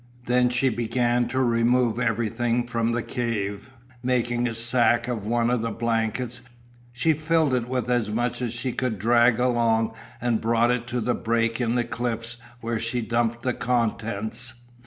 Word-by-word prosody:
Then 125 0 +3
she 125 +2 +2
began 120 +1 +1
to 130 - -2
remove 120 0 +2
everything 120 +1 0
from 115 -1 0
the 120 0 -1
cave. 105 -2 -3 0.3
Making 120 -1 +1
a 115 - -3
sack 120 0 +2
of 115 -5 -3
one 120 +1 +1
of 125 -2 +1
the 115 - -1
blankets, 115 +2 -1 0.5
she 125 +7 +2
filled 155 -1 +1
it 125 -1 0
with 125 -1 -1
as 120 -3 +1
much 120 +3 -1
as 120 -3 -1
she 120 +2 -3
could 125 -3 -2
drag 120 +3 +4
along 115 -2 +2 0.3
and 120 -2 0
brought 115 +1 +3
it 125 -1 -1
to 120 0 -2
the 125 +2 +1
break 115 +1 0
in 120 0 +1
the 120 - +2
cliffs 120 0 -3 0.2
where 115 -1 -2
she 115 +2 -1
dumped 115 +1 -1
the 125 - +1
contents. 115 -1 -1
120 Hz, 170 wpm, -25 LUFS, 115-125 Hz, 0.5 s, drag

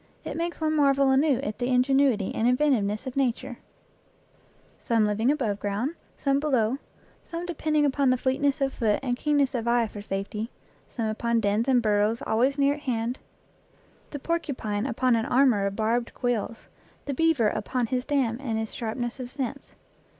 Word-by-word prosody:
It - - -5
makes 340 +1 -3
one 310 -1 0
marvel 275 -2 +4
anew 275 0 +3
at 215 -5 -4
the 245 - -1
ingenuity 255 -4 +2
and 225 - +1
inventive 255 -2 +3
ness 210 +4 -3
of 260 - -6
Nature 245 -2 -1 1.2
some 225 -2 +2
living 215 +4 +1
above 235 -9 0
ground, 210 +9 -2 0.2
some 275 -1 +1
below, 265 -4 +1 0.4
some 340 0 -6
depending 310 -3 0
upon 270 -2 +2
fleetness 275 +3 0
of 270 0 +1
foot 215 -4 +1
and 245 -2 0
keenness 285 0 +1
of 235 -2 -2
eye 235 0 +3
for 210 -1 -8
safety, 205 +3 -4 0.4
some 230 - -3
upon 230 +2 0
dens 210 +3 +1
and 250 -3 +3
burrows 210 +1 +1
always 255 +6 +2
near 280 0 +3
at 295 - -7
hand; 245 -3 -2 0.9
the 290 - -5
porcupine 265 -9 -2
upon 250 0 +2
an 225 0 0
armor 245 -6 +3
of 200 - -4
barbed 230 +2 -1
quills, 235 -2 -2 0.4
the 280 - -2
beaver 290 -7 +3
upon 250 +2 -2
his 250 +2 -1
dam 260 -5 0
and 230 -5 -2
his 220 -1 -3
sharpness 240 +2 -4
of 250 -1 -5
sense. 275 +1 -5
250 Hz, 170 wpm, -26 LUFS, 225-275 Hz, 1.2 s, marvel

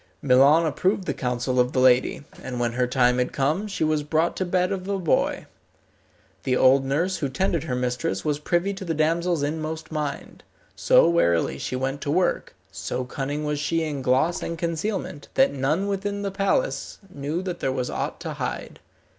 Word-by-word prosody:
Milon 140 +5 +5
approved 185 +6 0
the - - -1
counsel 125 0 -1
of 125 0 +2
the 130 - +1
lady, 130 +2 +3 0.2
and 125 -2 -5
when 120 -1 0
her 125 +1 0
time 125 0 +3
had 125 - 0
come 155 +10 0
she 200 - -2
was 155 -1 +1
brought 160 +3 0
to 185 - 0
bed 180 +1 +1
of 190 -1 -3
a 200 -1 0
boy. 175 -5 0 1.0
The 130 -1 +1
old 135 +1 +5
nurse 165 +8 0
who 140 - -2
tended 170 +3 -1
her 130 -5 -2
mistress 125 -6 -2
was 150 -1 0
privy 175 +5 0
to 195 - -7
the 165 -3 -2
damsel's 165 +1 +1
inmost 155 +2 -4
mind. 150 -2 -4 0.3
So - - +5
warily 85 - +2
she - - -3
went 135 +2 -2
to 140 - -4
work, 175 +4 0 0.2
so 130 - -4
cunning 140 +4 -3
was 150 -1 -1
she 165 +2 0
in 150 -3 -3
gloss 130 +7 +2
and 170 - -4
concealment, 170 -1 -3
that 270 0 +4
none 150 +8 0
within 200 +1 -2
the 200 - -2
palace 200 - -1 0.2
knew 150 +5 -3
that 180 -2 -4
there 135 - 0
was 125 -1 -2
aught - - -3
to - - -4
hide. - - -5
150 Hz, 190 wpm, -24 LUFS, 130-175 Hz, 1.0 s, Milon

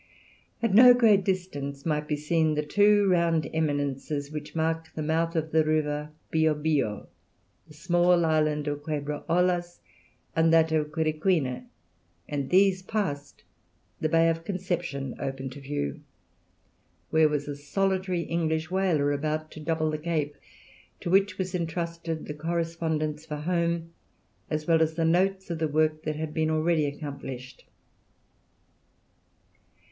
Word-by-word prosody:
At 230 -4 +2
no 245 +3 +9
great 215 -5 +5
distance 145 -8 -3
might 150 -2 -1
be 150 - 0
seen 155 +1 +1
the 150 - 0
two 205 +4 +4
round 170 -4 +2
eminences 145 -1 -2
which 150 0 -7
mark 160 0 -1
the 155 - -3
mouth 165 +2 0
of 160 -1 -1
the 160 0 +4
river 150 -1 0 0.2
Bio 160 -1 +3
Bio, 145 -9 -1 0.6
the 150 - -15
small 175 +1 +3
island 155 -2 +1
of 145 0 -2
Quebra 150 -1 -4
Ollas, 175 0 +1 0.6
and 165 0 +4
that 165 -1 +4
of 150 -1 0
Quiriquina, 155 - 0 0.6
and, 140 -2 -3
these 190 0 +4
passed, 185 -9 -4 0.6
the 155 - 0
Bay 165 +1 +4
of 165 0 0
Conception 175 -8 -3
opened 135 -1 -4
to 145 - -9
view, 135 - -3 1.1
where 160 -1 +5
was 150 -1 -2
a 145 - -4
solitary 185 +4 -1
English 160 -1 -1
whaler 175 -7 +2
about 155 +2 -2
to - - -10
double 155 0 0
the 155 - -3
Cape, 155 -3 -2 0.7
to 170 - -3
which 195 0 +3
was 185 -1 -3
entrusted 165 -1 -3
the 150 - -5
correspondence 160 -1 -2
for 155 -2 -5
home, 170 +1 -1 0.6
as 155 0 -2
well 165 -1 +3
as 160 0 +1
the 165 0 +1
notes 190 +2 +1
of 165 - -3
the 160 - +1
work 155 +1 +1
that 155 -1 -1
had 155 0 -5
already 155 -1 +1
been 140 - -9
accomplished. 135 -4 -8
160 Hz, 145 wpm, -27 LUFS, 150-170 Hz, 1.1 s, no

